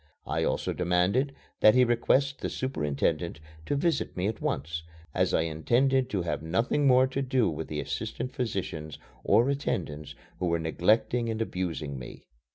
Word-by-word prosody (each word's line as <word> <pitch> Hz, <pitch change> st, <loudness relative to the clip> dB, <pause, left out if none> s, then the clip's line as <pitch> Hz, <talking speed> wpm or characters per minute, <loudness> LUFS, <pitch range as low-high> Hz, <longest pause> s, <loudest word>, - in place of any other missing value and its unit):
I -, -, -1 dB
also -, -, 0 dB
demanded 90 Hz, +10 st, +1 dB, 0.3 s
that 110 Hz, -, +7 dB
he 125 Hz, -, +6 dB
request 130 Hz, +3 st, +2 dB
the -, -, -3 dB
superintendent 80 Hz, -, -1 dB, 0.3 s
to -, -, +1 dB
visit 165 Hz, -, 0 dB
me 90 Hz, -, 0 dB
at 110 Hz, +2 st, -2 dB
once, 80 Hz, +1 st, -2 dB, 0.3 s
as -, -, +2 dB
I -, -, +3 dB
intended 120 Hz, -, +2 dB
to 95 Hz, -4 st, -1 dB
have 75 Hz, -3 st, -2 dB
nothing 115 Hz, -, +1 dB
more 130 Hz, 0 st, +6 dB
to 135 Hz, +1 st, -2 dB
do 130 Hz, -3 st, +2 dB
with 80 Hz, 0 st, -3 dB
the 75 Hz, -, -4 dB
assistant 125 Hz, -, -4 dB
physicians 95 Hz, -, -3 dB, 0.3 s
or 120 Hz, -, +4 dB
attendants 80 Hz, -, -2 dB, 0.2 s
who 90 Hz, -, 0 dB
were 85 Hz, 0 st, +2 dB
neglecting 110 Hz, +8 st, +1 dB
and 110 Hz, -1 st, -2 dB
abusing 85 Hz, -10 st, -3 dB
me. -, -, -10 dB
100 Hz, 165 wpm, -28 LUFS, 80-130 Hz, 0.3 s, that